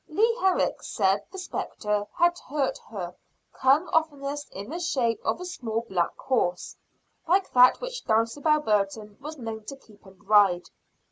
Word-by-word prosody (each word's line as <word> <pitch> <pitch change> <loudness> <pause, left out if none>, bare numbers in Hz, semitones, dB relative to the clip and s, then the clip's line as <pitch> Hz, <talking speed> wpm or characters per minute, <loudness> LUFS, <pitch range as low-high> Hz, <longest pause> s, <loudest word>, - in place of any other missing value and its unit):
Leah 455 +8 +2
Herrick 380 -3 +1
said 195 -1 +1
the 380 - -9
spectre 210 - -3
that 345 0 +3
hurt 280 -1 -2
her 180 -5 -5 0.5
came 275 +7 +4
oftenest 290 -2 -1
in 200 +7 -8
the 340 - -4
shape 255 -10 0
of - - 0
a 360 - -6
small 230 -11 -3
black 175 -4 -1
horse, 205 -9 -1 0.5
like 375 +3 +2
that 250 0 +7
which - - -5
Dulcibel 280 +8 +2
Burton 210 -2 -1
was 305 +2 -7
known 225 -3 -6
to 275 - -7
keep 215 -6 -21
and 190 +1 -19
ride. 200 -4 +4
250 Hz, 155 wpm, -26 LUFS, 210-315 Hz, 0.5 s, that